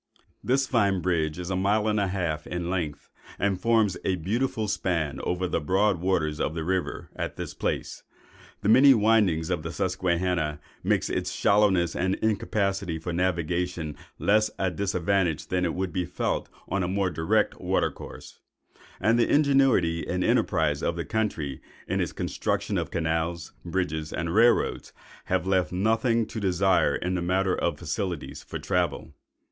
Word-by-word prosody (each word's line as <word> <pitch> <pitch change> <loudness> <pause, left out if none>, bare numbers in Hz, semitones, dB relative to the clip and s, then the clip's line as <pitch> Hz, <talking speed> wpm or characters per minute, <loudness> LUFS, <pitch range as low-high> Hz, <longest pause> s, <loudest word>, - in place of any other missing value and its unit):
This 135 +2 +2
fine 100 -7 +2
bridge 80 -3 0
is 90 +1 -5
a - - 0
mile 105 +3 +2
and 105 -1 +2
a 100 - +1
half 85 -5 -2
in 85 0 -3
length, 80 -6 -3 0.3
and 95 -2 0
forms 110 -4 +3
a 95 - +1
beautiful 110 +5 -1
span 85 -8 -1
over 90 +1 -1
the - - -1
broad 95 +3 +2
waters 80 -5 0
of 80 - -1
the 80 - -2
river 95 +2 -2
at - - -4
this - - -6
place. - - -3 0.6
The 100 - 0
many 135 +4 +8
windings 105 -7 +3
of 90 -3 0
the 80 +1 -5
Susquehanna 90 -4 0 0.2
make - - +1
its - - -2
shallowness 95 -5 +3
and 95 +2 +1
incapacity 100 -4 -1
for 85 +2 -5
navigation 90 -2 -1 0.2
less 110 +1 +3
a 95 -1 0
disadvantage 90 -3 0
than 90 -2 +1
would 95 0 -1
have - - -15
been 90 -2 -1
felt 90 - -2 0.2
on 100 +1 -1
a 90 - 0
more 95 0 0
direct 105 +7 0
water - - +1
course; - - -11 0.6
and 115 +4 +3
the 115 - +2
ingenuity 135 - +3
and 90 +1 -1
enterprise 80 - +1
of 85 - 0
the 85 -2 -4
country 80 -9 -2 0.3
in - - -1
the - - +1
construction - - -2
of - - -3
canals, 80 0 -2
bridges, 80 -4 -2
and 85 0 -2
rail 115 +2 +7
roads, - - -3 0.3
have 95 -1 0
left 95 -1 +1
nothing 110 +4 +2
to 110 - -6
desire 95 -1 +2
in 90 +1 -2
the 90 - -1
matter 95 +2 +1
of - - -1
facilities 90 -6 -4
for - - -6
travel. - - -1
90 Hz, 165 wpm, -26 LUFS, 85-100 Hz, 0.6 s, many